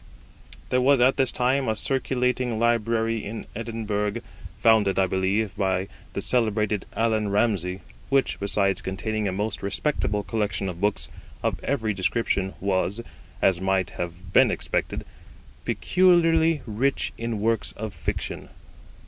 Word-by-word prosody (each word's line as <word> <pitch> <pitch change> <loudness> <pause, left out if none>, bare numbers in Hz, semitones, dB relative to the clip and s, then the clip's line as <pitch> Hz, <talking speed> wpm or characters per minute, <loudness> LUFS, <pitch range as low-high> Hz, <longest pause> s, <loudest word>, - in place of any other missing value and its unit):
There 125 - +2
was 135 +1 +5
at 130 +2 +4
this 130 -3 +2
time 130 +2 +1
a 110 - +1
circulating 125 -1 0
library 115 -1 +1
in 110 +2 -6
Edinburgh, 110 -1 -2 0.4
founded, 110 -4 +4
I 95 - +4
believe, 95 +3 0
by 95 -2 0 0.2
the - - -2
celebrated 110 -4 0
Allan 110 -2 +1
Ramsay, 100 -3 0 0.3
which, 135 -1 +2
besides 100 -1 +1
containing 105 +3 -2
a - - 0
most 105 +3 -3
respectable 105 +1 -1
collection 100 -4 -1
of 90 0 -7
books 105 0 0 0.4
of - - -1
every 110 -6 0
description, 95 0 0
was, 100 +3 0 0.4
as 95 -2 +4
might 95 -1 +1
have 90 +1 -6
been - - +6
expected, - - -2 0.6
peculiarly 165 -4 +3
rich 125 +5 0
in 115 -2 -2
works 115 +1 +1
of 110 -1 -6
fiction. - - -4
110 Hz, 130 wpm, -25 LUFS, 100-120 Hz, 0.6 s, been